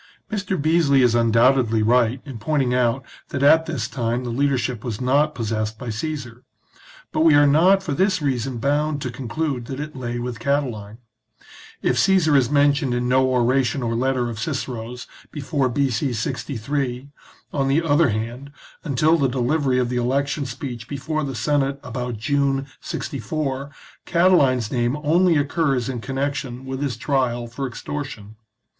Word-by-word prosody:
Mr. 195 -4 -2
Beesly 150 -3 +3
is 120 -2 +4
undoubtedly 115 0 +3
right 120 +2 +2
in 135 -6 -8
pointing 135 0 0
out 125 +1 +1 0.2
that 135 - -2
at 160 +3 +5
this 135 -9 -2
time 120 -1 -2
the 120 - -4
leadership 125 -3 0
was 115 -5 -4
not 145 +4 +2
possessed 110 -1 -2
by 125 -2 -5
Caesar; 125 -1 -5 0.7
but - - -2
we 160 -2 +6
are 145 0 +6
not 180 +7 +4
for 170 - -4
this 190 +4 +2
reason 130 -4 -2
bound 145 +4 0
to 130 -3 -4
conclude 130 +1 -3
that 135 +2 -6
it 150 0 -6
lay 120 -2 -4
with 120 -2 -4
Catiline. 120 -6 -2 0.9
If - - +2
Caesar 180 -6 +4
is 130 -4 +3
men 145 0 +4
tioned 135 -3 -1
in 120 0 -1
no 130 +1 +3
oration 130 +1 +1
or 115 -1 -1
letter 125 +1 0
of 115 -2 -5
Cicero's 125 -3 -4 0.2
before 140 -2 -1
B.C. 130 0 0
63, 130 +3 -3 0.4
on 135 -2 0
the 145 +5 +2
other 150 -1 +3
hand, 120 +6 -4 0.3
until 155 +3 +2
the 135 -2 +2
delivery 130 +1 +1
of 125 -1 +1
the 125 - -2
election 135 +3 0
speech 120 -3 -6
before 145 +3 -3
the 135 -2 -4
Senate 140 +4 0
about 125 -3 -4
June, 140 +3 0
64, 140 -1 -4 0.4
Catiline's 145 - +3
name 120 +2 0
only 170 +2 +4
occurs 140 -4 0
in 125 -3 -4
connection 135 -1 -3
with 130 +1 -5
his 135 -5 -2
trial 125 -2 0
for 125 +4 -5
ex 120 - -9
tortion. 140 -8 -6
135 Hz, 165 wpm, -22 LUFS, 120-145 Hz, 0.9 s, we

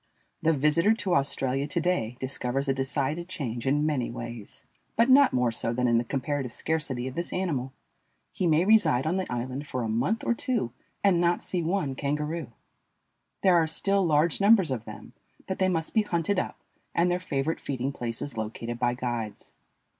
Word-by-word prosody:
The 165 - +3
visitor 160 +8 +3
to 190 -4 -1
Australia 135 -2 +1
to 170 +4 0
day 140 -9 -1
discovers 130 +1 -1
a 135 - +3
decided 140 +5 -1
change 135 -9 -3
in 145 +2 +2
many 145 -6 0
ways, 120 -3 -7 0.3
but 230 +3 +3
not 280 +1 +7
more 125 -2 +1
so 115 +1 0
than 125 +1 +1
in 120 -1 +4
the - - -1
comparative 135 0 -2
scarcity 145 -4 -1
of 130 - -5
this 170 +4 -3
animal. 145 -9 -2 0.6
He 180 - -1
may 160 +2 +3
reside 165 - +4
on 170 +4 +1
the 190 - -3
island 130 +4 -4
for 125 -2 -3
a - - -2
month 135 - 0
or - - +2
two 235 - -1 0.3
and 185 -4 +4
not 175 0 +1
see 180 - -1
one 165 -4 -1
kangaroo. 150 +1 -3 0.9
There 185 -2 +5
are 165 -2 +4
still 195 +5 +1
large 160 +2 +2
numbers 200 -6 +5
of 120 -3 -3
them, - - -10 0.3
but 190 - -4
they 190 0 +3
must 165 -3 -1
be 220 - +4
hunted 185 -1 0
up - - -4 0.4
and 175 +1 +3
their 180 - 0
favorite 155 -3 -2
feeding 135 0 -3
places 120 +1 -5
located 115 +2 -4
by 120 0 +1
guides. 120 -4 -4
145 Hz, 185 wpm, -27 LUFS, 125-175 Hz, 0.9 s, not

